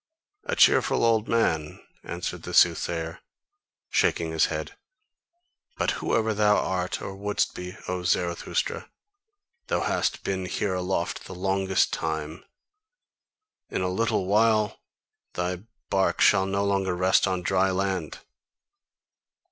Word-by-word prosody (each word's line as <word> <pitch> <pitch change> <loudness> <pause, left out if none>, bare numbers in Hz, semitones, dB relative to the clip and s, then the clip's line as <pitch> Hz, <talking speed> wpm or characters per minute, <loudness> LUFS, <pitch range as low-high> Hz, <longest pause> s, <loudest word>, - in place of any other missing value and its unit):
"A - - -1
cheerful - - +4
old 110 -1 +2
man?" 80 -10 0 0.2
answered - - -5
the - - -5
soothsayer, 80 -1 +2 0.7
shaking - - +1
his - - +3
head, - - -4 1.0
"but - - +1
whoever 110 -1 +1
thou 105 0 +3
art, 90 0 -2
or 95 - -6
wouldst 100 +1 -1
be, 90 0 -7
O 90 0 -2
Zarathustra, 90 - -1 0.8
thou - - 0
hast - - -1
been 95 -1 -2
here 95 +2 -1
aloft 90 -1 -2
the 95 - -8
longest 95 +1 +1
time, 80 +1 -3 1.3
in 95 - -2
a 90 - 0
little 95 0 0
while 110 +1 +2 0.5
thy 90 +1 -2 0.3
bark 95 -1 +1
shall 95 0 +5
no 100 +1 0
longer 95 -2 0
rest 95 +2 +3
on 95 -1 -1
dry 95 +2 +2
land!" 95 -4 -2
95 Hz, 125 wpm, -26 LUFS, 90-100 Hz, 1.3 s, shall